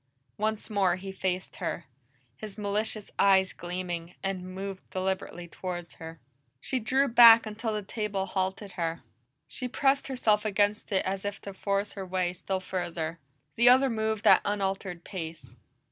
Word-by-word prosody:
Once 215 0 -1
more 195 -4 +3
he 190 +1 -7
faced 185 -1 -3
her, 170 - -3 0.5
his 210 - -9
malicious 210 +1 -2
eyes 190 -1 +5
gleaming, 175 -1 -5
and 195 -1 -2
moved 195 0 -6
deliberately 185 -2 -3
toward 175 0 -6
her. 165 -1 -9 0.4
She 260 - -1
drew 265 +5 +2
back 230 -1 +9
until 220 +1 -3
the 210 -1 -2
table 205 -2 -2
halted 190 +1 -2
her; 170 -2 -3 0.4
she 250 - -3
pressed 275 +2 +2
herself 220 -6 +2
against 210 +1 +1
it 190 - +1
as 190 0 -2
if 205 0 -4
to 200 - -7
force 200 +1 -1
her 195 - -5
way 185 -1 -1
still 190 +1 -3
further. 175 -3 -4 0.4
The 240 +2 +7
other 260 +1 +6
moved 220 -1 -1
at - - +7
unaltered 195 -3 -2
pace. 165 -4 -7
195 Hz, 155 wpm, -28 LUFS, 180-215 Hz, 0.5 s, back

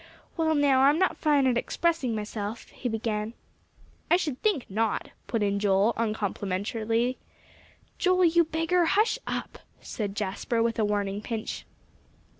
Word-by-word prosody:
"Well, 320 -1 +1
now, 280 -3 +4
I'm 285 +3 +5
not 375 +2 +1
fine 295 -3 +3
at 245 -2 +3
expressing 325 -9 0
myself," 210 +1 -5
he 245 - -4
began. 220 0 -2 0.7
"I 345 - +6
should 300 -8 -3
think 405 - +1
not," 220 +2 -1 0.2
put 230 -3 0
in 200 0 +1
Joel 200 +2 +3
uncomplimentarily. 220 +2 -1 0.8
"Joe, 365 0 +3
you 340 0 +5
beggar, 330 +2 +1
hush 430 +8 +2
up!" - - -4 0.2
said 205 -3 -5
Jasper, 210 +3 -1
with 230 0 -1
a 215 - +3
warning 205 -1 -1
pinch. 220 -1 -5
230 Hz, 140 wpm, -27 LUFS, 210-310 Hz, 0.8 s, I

